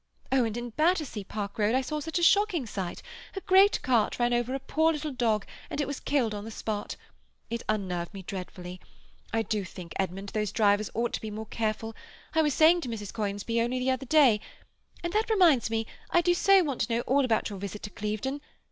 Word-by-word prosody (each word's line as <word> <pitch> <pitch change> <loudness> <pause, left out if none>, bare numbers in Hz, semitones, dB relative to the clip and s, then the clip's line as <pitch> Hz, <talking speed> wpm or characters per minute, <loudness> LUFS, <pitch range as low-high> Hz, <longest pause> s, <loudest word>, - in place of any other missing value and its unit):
Oh, 265 -2 +4
and 225 0 -3
in 240 0 -5
Battersea 310 - +1
Park 205 +2 -5
Road 215 +3 +3
I 260 - +3
saw 300 +4 -3
such 320 +3 -3
a 345 - 0
shocking 390 - +4
sight; 190 -5 -5 0.3
a 390 - -4
great 385 +3 +5
cart 235 -5 +2
ran 240 0 +2
over 240 +2 0
a - - -2
poor 315 +4 +2
little 305 -1 -3
dog, 225 -5 0 0.2
and - - -4
it 290 - +1
was 285 0 -4
killed 255 -7 0
on 205 -1 -5
the 220 - -7
spot. 215 -1 -4 0.6
It 235 0 -2
unnerved 185 -5 -1
me 195 -2 -8
dreadfully. 180 -1 -7 0.5
I 225 0 +1
do 210 -1 -1
think, 180 -2 -9
Edmund, 195 +1 -3
those 210 -1 -2
drivers 210 -1 +2
ought 235 +1 0
to - - -2
be 220 - -5
more 215 +1 -6
careful. 225 0 -3 0.4
I 320 - +4
was 300 -3 +1
saying 335 +2 +6
to 255 - -5
Mrs. 210 -3 -5
Conisbee 210 +2 -1
only 240 +2 0
the 255 +1 +1
other 260 0 -3
day—and 295 - 0
that 435 +1 +1
reminds 340 - +4
me, 225 0 -1 0.2
I 345 - +4
do 350 +1 +3
so 390 +1 +5
want 280 -6 -2
to - - -1
know 235 - +1
all 275 +3 +2
about 225 -3 +1
your 200 - -6
visit 200 +1 -6
to 210 - -6
Clevedon. 215 +8 -3
235 Hz, 220 wpm, -28 LUFS, 210-290 Hz, 0.6 s, saying